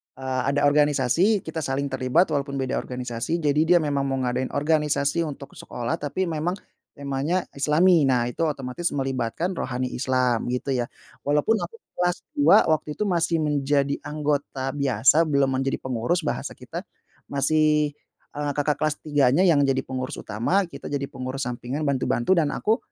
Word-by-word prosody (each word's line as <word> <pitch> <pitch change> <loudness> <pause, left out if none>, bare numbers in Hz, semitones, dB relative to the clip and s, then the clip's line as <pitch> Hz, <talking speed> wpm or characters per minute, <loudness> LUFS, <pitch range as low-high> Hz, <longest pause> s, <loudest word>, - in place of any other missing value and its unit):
eee, 130 -1 -2
ada 145 - +1
organisasi, 150 - +3
kita 160 0 -5
saling 140 -1 -2
terlibat 130 +7 +2
walaupun 140 -1 -1
beda 130 -1 -1
organisasi, 125 +5 -3
jadi 145 0 +2
dia 175 0 +6
memang 140 -2 0
mau 135 0 -1
ngadain 125 +1 -1
organisasi 150 +1 +1
untuk 140 -1 -8
sekolah 120 -1 -4
tapi 150 +6 -2
memang 165 +4 -1 0.4
temanya 140 +5 -1 0.2
islami. 155 +2 +4
Nah, 125 -2 +2
itu 165 +6 -1
otomatis 140 +2 -4
melibatkan 135 +6 -2
Rohani 125 0 -2
Islam, 125 -2 +1
gitu, 125 +2 -3
ya. 120 - 0 0.4
Walaupun 150 +10 +2
aku 460 - -5 0.2
kelas 175 0 +1 0.2
2 285 -7 +7
waktu 155 -1 0
itu - - -10
masih 170 -1 +2
menjadi 140 -1 +1
anggota 145 -3 -2
biasa, 135 +4 +4
belum 140 -3 +2
menjadi 135 0 -1
pengurus 130 +8 -1
bahasa 155 - -3
kita, - - -8 0.4
masih, 150 +1 +2 0.4
eee, 145 -1 -1
kakak 145 -1 +1
kelas 155 -1 0
3-nya 145 +1 +3
yang 155 -5 +5
jadi 135 -1 +1
pengurus 130 +2 -4
utama, 120 - 0
kita 140 - -11
jadi 140 -1 -2
pengurus 130 +1 -4
sampingan, 125 +4 -4
bantu-bantu, 140 +4 +1
dan 150 -3 +2
aku 220 +2 +1
145 Hz, 155 wpm, -24 LUFS, 130-155 Hz, 0.4 s, 2